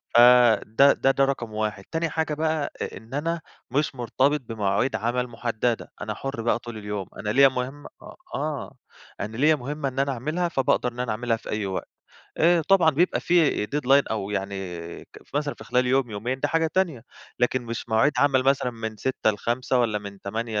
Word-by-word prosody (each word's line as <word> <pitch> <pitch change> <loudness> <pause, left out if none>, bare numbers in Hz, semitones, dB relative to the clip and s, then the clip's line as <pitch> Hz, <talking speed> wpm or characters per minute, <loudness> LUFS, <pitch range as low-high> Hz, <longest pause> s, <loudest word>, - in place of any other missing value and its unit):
فده 120 +1 +6
ده 135 - +2
ده 135 0 +3
رقم 120 -5 -3
1. 105 -2 -2
تاني 165 0 -1
حاجة 160 -1 -1
بقى 155 -1 -1
أ - - -4
إن 115 +4 -14
أنا 165 +3 -1 0.3
مش 145 0 0
مرتبط 135 +4 +1
بمواعيد 110 +1 -1
عمل 120 +4 -1
محددة، 115 0 -2
أنا 105 0 -3
حُرْ 135 +1 -5
بقى 115 +1 +1
طول 120 -1 -8
اليوم. 105 -3 -5
أنا 105 - -3
ليّا 135 +5 +6
مهمة 130 +3 -5
أ - - -12 0.3
آه، 150 -2 -4 0.4
أنا 105 +3 -5
ليّا 155 +3 +5
مهمة 145 +1 -3
إن 135 +1 -5
أنا 140 0 +1
أعملها، 155 +8 -2
فباقدر 130 -4 +1
إن 125 - -11
أنا 125 -2 -1
أعملها 115 +1 0
في - - -12
أي 105 -1 -2
وقت. 95 -1 -4 0.5
آآ، 170 0 +4
طبعًا 180 -5 +6
بيبقى 170 +5 +1
في 165 -11 +2
deadline 140 0 +3
أو 105 -2 -2
يعني 100 -1 -3 0.5
ك - - -15 0.2
مثلًا 145 -1 -1
في - - -12
خلال 125 0 +1
يوم، 130 -2 +2
يومين، 120 +6 -3
دي 145 - +1
حاجة 165 +1 +2
تانية. 165 -11 0 0.4
لكن 125 0 +1
مش 115 0 -6
مواعيد 110 +6 +3
عمل 135 -1 +4
مثلًا 135 -2 +2
من 110 -2 -6
06:00 120 0 0
ل17:00، 120 +4 0
والّا 110 -3 +1
من 100 -1 -10
08:00 110 +1 -3
125 Hz, 190 wpm, -25 LUFS, 110-145 Hz, 0.5 s, فده